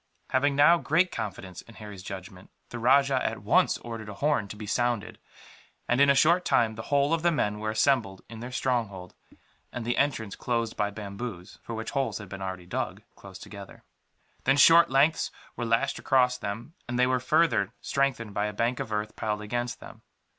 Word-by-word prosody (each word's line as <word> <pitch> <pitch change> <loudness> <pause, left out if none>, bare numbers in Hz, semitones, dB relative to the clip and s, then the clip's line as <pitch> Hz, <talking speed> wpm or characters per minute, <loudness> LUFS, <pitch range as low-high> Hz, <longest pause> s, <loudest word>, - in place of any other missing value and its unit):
Having 140 +2 +2
now 155 +4 +6
great 165 +4 +2
confidence 95 -5 -6
in 115 - -16
Harry's 105 -3 -9
judgment, 95 0 -9 0.2
the 120 - -6
rajah 135 +2 +3
at - - -3
once - - +3
ordered 115 -3 -8
a 105 - -7
horn 145 -5 0
to 100 - -8
be 105 +1 -8
sounded 120 0 -1 0.7
and, 125 +3 +2
in 140 - +6
a 140 - +5
short 170 +6 +4
time, 115 -8 +2
the 110 - -7
whole 145 +2 +2
of 165 - +1
the 175 - +3
men 105 -9 -1
were 110 0 -2
assembled 110 -4 +1
in 115 0 -10
their 120 +2 -7
stronghold; 110 -9 -2 0.6
and 120 - -5
the 120 - -1
entrance 115 -8 0
closed 115 -2 -2
by 105 -1 0
bamboos, 100 -1 -7
for 115 - -6
which 110 0 -5
holes 130 -7 -1
had 105 -3 -9
been 95 0 -8
already 95 -2 -5
dug, 90 - -4
close 95 -1 -12
together. 100 -1 -11 0.6
Then 135 +2 +4
short 165 +4 +7
lengths 145 +5 +3 0.3
were 120 - -3
lashed 115 +4 +1
across 125 -2 +3
them, 115 +5 -6
and 120 +1 -3
they 125 - +4
were 130 0 +1
further 130 - +2
strengthened 130 -6 -1
by 105 +1 0
a 105 - -5
bank 120 +4 -1
of 130 -5 -5
earth 105 0 -3
piled 105 -1 -3
against 120 +3 -3
them. - - -12
115 Hz, 195 wpm, -27 LUFS, 105-135 Hz, 0.7 s, short